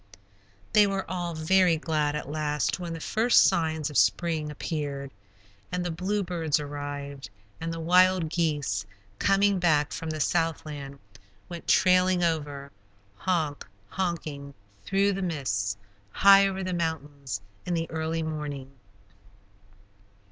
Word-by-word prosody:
They 210 -1 +6
were 195 -1 -2
all 175 -2 -3
very 175 +1 +3
glad, 155 -2 0
at 150 - -4
last, 150 +2 -1
when 175 -2 -5
the 165 - -6
first 225 +8 +4
signs 160 -3 +1
of 145 - +3
spring 160 -3 +1
appeared, 145 -2 -4 0.6
and 180 0 -2
the 175 - -1
bluebirds 175 -3 -1
arrived, 145 -3 -6 0.3
and 165 +1 -3
the 165 - -5
wild 180 +1 +4
geese, 145 - -1 0.4
coming 200 0 +3
back 150 -4 +2
from 165 - -5
the 155 0 -3
southland, 150 -3 -1 0.5
went 170 -1 -8
trailing 185 -1 +4
over, 145 -4 -2 0.4
"honk, 155 - -1 0.3
honking" 155 -6 -4 0.3
through 200 +1 +2
the 195 - -3
mists, 110 - -1 0.3
high 195 - +6
over 190 0 -3
the 185 0 -2
mountains, 145 -8 -3 0.3
in 175 - 0
the 165 0 -1
early 160 0 -2
morning. 145 -4 -5
160 Hz, 125 wpm, -27 LUFS, 145-180 Hz, 0.6 s, They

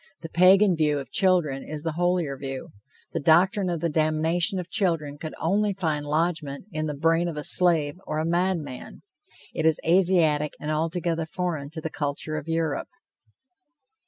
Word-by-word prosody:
The 165 - -7
Pagan 185 +3 +5
view 150 -2 +1
of 140 - -7
children 175 -8 +3
is 150 +1 -6
the 165 - -1
holier 175 -3 0
view. 135 -1 -6 0.4
The - - -1
doctrine 185 +5 +3
of 170 -3 -3
the 170 - 0
damnation 160 +5 0
of 180 -2 -4
children 165 -10 0
could 155 - -6
only 200 +4 +1
find 155 -6 -2
lodgment 155 -2 -2
in 155 0 -3
the 150 - -4
brain 165 +3 +2
of 165 -3 -5
a 150 - -4
slave 165 -4 +3
or 155 - -2
a 155 - -1
madman. 170 -6 -2 0.5
It 160 - -2
is 160 -1 +3
Asiatic 165 -4 +3
and 150 - -4
altogether 165 +1 -1
foreign 160 -5 -3
to 160 +1 -7
the 160 - -5
culture 145 +1 -3
of 155 0 -5
Europe. 165 -2 -1
160 Hz, 170 wpm, -25 LUFS, 150-175 Hz, 0.5 s, Pagan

